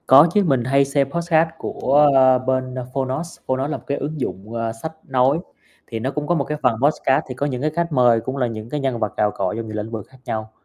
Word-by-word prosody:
Có 140 Hz, +5 st, +8 dB
chứ, 210 Hz, -, +4 dB
mình 135 Hz, -7 st, +2 dB
hay 135 Hz, +3 st, +3 dB
xem 140 Hz, 0 st, 0 dB
podcast 170 Hz, -1 st, +2 dB
của, 145 Hz, +1 st, +3 dB
ờ, 130 Hz, -1 st, +6 dB
bên 130 Hz, 0 st, -1 dB, 0.2 s
Fonos, 135 Hz, +5 st, -3 dB
Fonos 130 Hz, +1 st, 0 dB
là 150 Hz, -, -2 dB
một -, -, -16 dB
cái 140 Hz, -, -1 dB
ứng 150 Hz, +2 st, -4 dB
dụng, 100 Hz, +1 st, -5 dB
à, 115 Hz, -1 st, -2 dB
sách 115 Hz, +8 st, -6 dB, 0.2 s
nói, 130 Hz, +3 st, +2 dB, 0.5 s
thì 115 Hz, -, -4 dB
nó 130 Hz, +4 st, -2 dB
cũng 150 Hz, 0 st, -4 dB
có 175 Hz, -, +2 dB
một 145 Hz, -, +1 dB
cái 150 Hz, +2 st, -4 dB
phần 125 Hz, -3 st, +3 dB
podcast 145 Hz, -1 st, +2 dB
thì 130 Hz, -, -5 dB
có 140 Hz, -, -1 dB
những 130 Hz, -4 st, -2 dB
cái 155 Hz, -, +1 dB
khách 170 Hz, 0 st, 0 dB
mời, 120 Hz, -4 st, +4 dB
cũng 130 Hz, +4 st, -4 dB
là 125 Hz, -2 st, +1 dB
những 110 Hz, -1 st, -7 dB
cái 150 Hz, -, -2 dB
nhân 135 Hz, -4 st, -1 dB
vật 105 Hz, -3 st, -2 dB
cào 105 Hz, 0 st, +2 dB
cọ 95 Hz, -1 st, -2 dB
trong 115 Hz, -1 st, -4 dB
nhiều 110 Hz, -, -6 dB
lĩnh 110 Hz, +1 st, -4 dB
vực 110 Hz, -3 st, -5 dB
khác 130 Hz, -, -18 dB
nhau. 110 Hz, 0 st, -4 dB
130 Hz, 265 wpm, -21 LUFS, 115-145 Hz, 0.5 s, Có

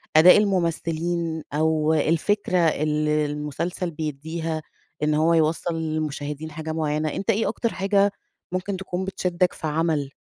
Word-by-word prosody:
أداء 165 Hz, +4 st, +9 dB
الممثلين 170 Hz, -4 st, 0 dB
أو 155 Hz, +1 st, +2 dB
الفكرة 170 Hz, +5 st, +1 dB
اللي 150 Hz, -2 st, +2 dB
المسلسل 150 Hz, +5 st, -3 dB
بيديها، 160 Hz, +1 st, -4 dB, 0.4 s
إن 150 Hz, 0 st, +2 dB
هو 160 Hz, +2 st, +3 dB
يوصل 165 Hz, +1 st, +1 dB
للمشاهدين 155 Hz, -1 st, -3 dB
حاجة 160 Hz, +1 st, -5 dB
معينة، 155 Hz, -1 st, 0 dB
أنتَ 200 Hz, -, -4 dB
إيه 225 Hz, -1 st, +2 dB
أكتر 230 Hz, +1 st, -2 dB
حاجة 200 Hz, +1 st, +2 dB, 0.4 s
ممكن 185 Hz, +2 st, -2 dB
تكون 190 Hz, 0 st, -4 dB
بتشدك 180 Hz, -2 st, 0 dB
في 160 Hz, -, -5 dB
عمل؟ 155 Hz, -2 st, 0 dB
160 Hz, 130 wpm, -24 LUFS, 155-180 Hz, 0.4 s, أداء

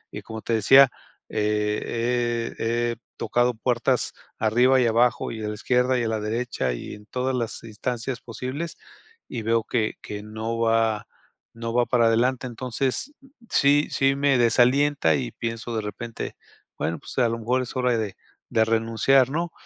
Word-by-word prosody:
y -, -, -5 dB
como 110 Hz, 0 st, -8 dB
te 115 Hz, -, -2 dB
decía, 130 Hz, +4 st, +7 dB, 0.4 s
eh 115 Hz, +3 st, -1 dB
he 120 Hz, +1 st, 0 dB
he -, -, -12 dB, 0.2 s
tocado 120 Hz, +1 st, +1 dB
puertas 120 Hz, +2 st, 0 dB, 0.3 s
arriba 125 Hz, +4 st, +4 dB
y -, -, +3 dB
abajo 115 Hz, +1 st, +2 dB
y 110 Hz, -1 st, -6 dB
a -, -, -2 dB
la 105 Hz, -, -4 dB
izquierda 125 Hz, +3 st, +1 dB
y -, -, 0 dB
a 115 Hz, -, 0 dB
la 110 Hz, -1 st, -1 dB
derecha 110 Hz, -, -2 dB
y -, -, -7 dB
en 105 Hz, 0 st, -15 dB
todas 130 Hz, +1 st, -1 dB
las 115 Hz, -2 st, -3 dB
instancias 115 Hz, +3 st, -4 dB
posibles 130 Hz, +8 st, -5 dB, 0.5 s
y 120 Hz, -, -5 dB
veo 115 Hz, 0 st, +2 dB
que 110 Hz, -2 st, -1 dB
que 105 Hz, 0 st, -6 dB
no 110 Hz, +2 st, -4 dB
va 115 Hz, -2 st, +1 dB, 0.5 s
no 115 Hz, 0 st, -5 dB
va 120 Hz, 0 st, +3 dB
para 120 Hz, -2 st, +3 dB
adelante. 125 Hz, +3 st, +2 dB
Entonces, 130 Hz, -, -2 dB, 0.4 s
sí 145 Hz, +2 st, +4 dB
sí 135 Hz, 0 st, +2 dB
me 140 Hz, -1 st, +3 dB
desalienta 125 Hz, -, +3 dB
y 65 Hz, -4 st, -3 dB
pienso 115 Hz, 0 st, -4 dB
de 110 Hz, -, 0 dB
repente: 115 Hz, +2 st, -6 dB, 0.4 s
Bueno, 80 Hz, -1 st, -2 dB
pues -, -, -10 dB
a 120 Hz, -, +4 dB
lo 115 Hz, 0 st, -3 dB
mejor 125 Hz, +3 st, +1 dB
es 125 Hz, -, -8 dB
hora 125 Hz, -2 st, +2 dB
de 105 Hz, -3 st, -3 dB, 0.3 s
de 110 Hz, 0 st, +3 dB
renunciar, 115 Hz, +4 st, +3 dB
¿no?" 170 Hz, +2 st, -2 dB
115 Hz, 170 wpm, -24 LUFS, 110-125 Hz, 0.5 s, decía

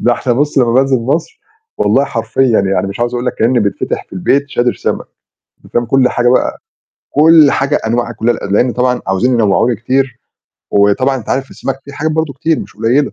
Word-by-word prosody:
ده 120 Hz, -, +2 dB
إحنا 120 Hz, -, -1 dB
بُص 145 Hz, +4 st, 0 dB
لمّا 120 Hz, -3 st, +3 dB
بانزِل 135 Hz, +1 st, +3 dB
مصر 155 Hz, -, -2 dB, 0.4 s
والله -, -, +2 dB
حرفيًا 130 Hz, -4 st, 0 dB
يعني 95 Hz, -1 st, 0 dB
مش 100 Hz, +4 st, -7 dB
عاوز 120 Hz, +1 st, -1 dB
أقول 120 Hz, +1 st, -3 dB
لك -, -, -1 dB
كإن 115 Hz, +3 st, +1 dB
بتفتح 100 Hz, -1 st, -2 dB
في -, -, -31 dB
البيت 140 Hz, +10 st, 0 dB
شادر 120 Hz, -2 st, 0 dB
سمك، -, -, -3 dB, 0.6 s
أنت -, -, -18 dB
فاهم، 120 Hz, -, +1 dB
كل 130 Hz, +2 st, +2 dB
حاجة 120 Hz, 0 st, +1 dB
بقى 125 Hz, -, +1 dB, 0.5 s
كل 155 Hz, -1 st, +5 dB
حاجة 140 Hz, +2 st, 0 dB
أنواع 120 Hz, +1 st, -1 dB
كلّها 120 Hz, 0 st, -1 dB
ال 100 Hz, -, -3 dB
لإن 120 Hz, +3 st, +2 dB
طبعًا 125 Hz, 0 st, 0 dB
عاوزين 95 Hz, +7 st, +1 dB
ينوّعوا 110 Hz, -1 st, +2 dB
لي 120 Hz, -, 0 dB
كتير، 130 Hz, +3 st, -1 dB, 0.5 s
وطبعًا 105 Hz, +7 st, +2 dB
أنت 120 Hz, -, -9 dB
عارف 135 Hz, 0 st, -2 dB
السمك 135 Hz, 0 st, -5 dB
في 140 Hz, -, -11 dB
حاجات 155 Hz, +2 st, -2 dB
برضه 160 Hz, -2 st, -1 dB
كتير 155 Hz, +4 st, -1 dB
مش -, -, -10 dB
قليلة. 125 Hz, +6 st, +1 dB
125 Hz, 205 wpm, -14 LUFS, 115-135 Hz, 0.6 s, كل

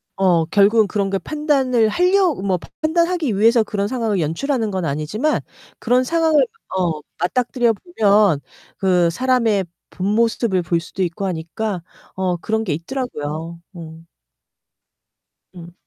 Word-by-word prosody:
어. 180 Hz, -4 st, +3 dB
결국은 205 Hz, +4 st, +4 dB
그런 200 Hz, 0 st, -1 dB
걸 195 Hz, -, -1 dB
판단을 270 Hz, -6 st, +1 dB
할려 365 Hz, -, +3 dB
뭐 190 Hz, -1 st, -1 dB, 0.2 s
판단하기 330 Hz, -, +1 dB
위해서 230 Hz, +2 st, +4 dB
그런 205 Hz, -1 st, -2 dB
상황을 225 Hz, -5 st, -1 dB
연출하는 220 Hz, -, -1 dB
건 185 Hz, -3 st, -2 dB
아니지만 160 Hz, -, -1 dB, 0.4 s
그런 250 Hz, +2 st, +2 dB
상황을 320 Hz, +1 st, +2 dB
만 455 Hz, -2 st, -1 dB, 0.2 s
어 160 Hz, -4 st, -1 dB, 0.2 s
맞닥뜨려 240 Hz, +5 st, +1 dB
보면 205 Hz, -, +2 dB, 0.4 s
그 180 Hz, -3 st, +2 dB
사람의 230 Hz, -2 st, +1 dB, 0.2 s
본 185 Hz, -, -5 dB
모습을 225 Hz, -4 st, +1 dB
볼 170 Hz, 0 st, 0 dB
수도 185 Hz, +3 st, -7 dB
있고 180 Hz, +2 st, -2 dB
하니까 180 Hz, +3 st, -3 dB, 0.3 s
어 185 Hz, -1 st, 0 dB
그런 220 Hz, +5 st, -2 dB
게 175 Hz, -, -1 dB
있더라고요. 165 Hz, -, -5 dB, 0.2 s
음. 165 Hz, -1 st, -10 dB, 1.5 s
음. 175 Hz, -1 st, -11 dB
205 Hz, 280 characters per minute, -20 LUFS, 175-255 Hz, 1.5 s, 결국은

